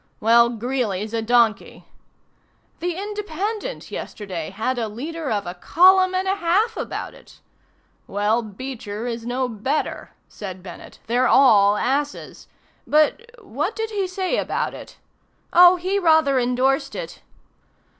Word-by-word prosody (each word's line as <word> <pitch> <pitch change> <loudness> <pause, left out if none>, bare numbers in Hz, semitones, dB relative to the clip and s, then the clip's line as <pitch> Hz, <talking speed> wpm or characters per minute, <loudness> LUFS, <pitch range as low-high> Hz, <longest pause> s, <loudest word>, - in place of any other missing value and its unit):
"Well, 235 +2 +5
Greeley's 230 -3 -3
a 230 - 0
donkey." 230 -1 +1 0.9
"The 350 +1 -2
'Independent' 415 +3 -5
yesterday 185 -6 -6
had 225 +6 -2
a 225 - -1
leader 295 +8 -5
of 205 -2 -1
a 175 - -5
column 370 - +4
and 375 +1 -1
a 385 +1 +1
half 400 +6 +1
about - - -5
it." - - -18 0.7
"Well, 210 +4 0
Beecher 220 -1 -7
is 235 -1 -5
no 255 +1 -1
better," 245 +6 -3 0.2
said 190 -3 -9
Bennett. 180 -2 -11
"They're 245 +3 +2
all 210 -6 +5
asses. 285 +5 -3 0.4
But 310 +10 +2
what 335 - -3
did 445 -1 -3
he 400 -3 -1
say 370 0 -2
about - - -2
it?" - - -11 0.6
"Oh, 355 +1 +8
he 375 +3 -1
rather 315 -6 +4
indorsed 255 +2 0
it." - - -7
260 Hz, 135 wpm, -22 LUFS, 220-365 Hz, 0.9 s, Oh